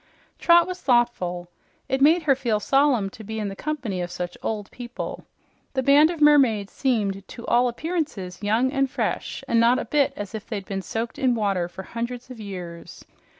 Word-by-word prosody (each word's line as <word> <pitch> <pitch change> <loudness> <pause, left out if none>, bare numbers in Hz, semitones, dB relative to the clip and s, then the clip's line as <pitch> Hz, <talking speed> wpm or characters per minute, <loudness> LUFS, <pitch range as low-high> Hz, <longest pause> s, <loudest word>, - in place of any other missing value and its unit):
Trot 340 0 +6
was 365 0 -6
thoughtful. 210 -9 +1 0.4
It 265 0 -1
made 320 +4 +5
her 290 -3 +4
feel 235 -5 0
solemn 260 -4 +2
to 220 - -11
be 220 +1 -6
in 210 -2 -2
the 195 - -7
company 245 -10 -3
of 175 - -3
such 175 0 -5
old 210 -2 -4
people. 245 -1 -7 0.5
The 265 -1 0
band 285 +4 +6
of 340 -2 -4
mermaids 265 -9 +4
seemed 200 -7 -1
to 235 - -9
all 245 +1 +3
appearances 240 - -3
young 225 +5 +2
and 275 -1 +1
fresh - - -3
and 230 - +3
not 235 +2 +5
a - - -3
bit 285 -2 +2
as 205 0 -6
if 220 -1 -6
they'd 200 -4 -4
been 195 0 -3
soaked 225 +5 -4
in 255 -2 +2
water 195 -5 0
for 190 +2 -9
hundreds 240 +4 -5
of 245 - -9
years. 180 -5 -8
235 Hz, 195 wpm, -24 LUFS, 200-270 Hz, 0.5 s, Trot